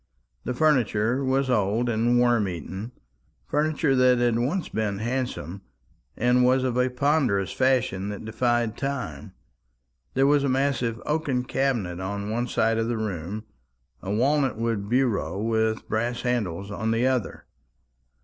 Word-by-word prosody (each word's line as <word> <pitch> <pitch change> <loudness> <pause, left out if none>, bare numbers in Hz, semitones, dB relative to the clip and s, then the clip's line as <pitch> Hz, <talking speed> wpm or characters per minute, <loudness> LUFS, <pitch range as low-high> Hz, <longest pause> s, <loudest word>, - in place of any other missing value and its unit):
The 125 - -2
furniture 125 -4 +2
was 135 +1 +1
old 115 0 +1
and 120 +1 +2
worm 120 -4 +3
eaten, 95 - -6 0.5
furniture 150 -1 +1
that 125 -1 +5
had 120 -1 +2
once 155 +10 -1
been 105 -2 -2
handsome, 115 - -3 0.6
and 125 +1 +3
was 130 +1 +3
of 125 -2 0
a 125 0 +2
ponderous 125 -7 +1
fashion 125 -7 +1
that 105 +1 -6
defied 120 0 0
time. 130 - -4 0.8
There 135 +1 +4
was 145 0 +4
a 140 - +1
massive 130 -3 0
oaken 150 -5 0
cabinet 120 -10 -1
on 100 +2 -4
one 120 +2 -1
side 115 -1 +1
of 115 - 0
the 120 -1 -1
room, 105 -1 -4 0.6
a 95 - -6
walnut 130 +3 +1
wood 115 -3 -2
bureau 120 -6 0
with 110 0 0
brass 120 +2 -2
handles 100 -6 -2
on 110 +2 -2
the 115 +2 +1
other. 130 -4 -1
120 Hz, 145 wpm, -25 LUFS, 105-130 Hz, 0.8 s, that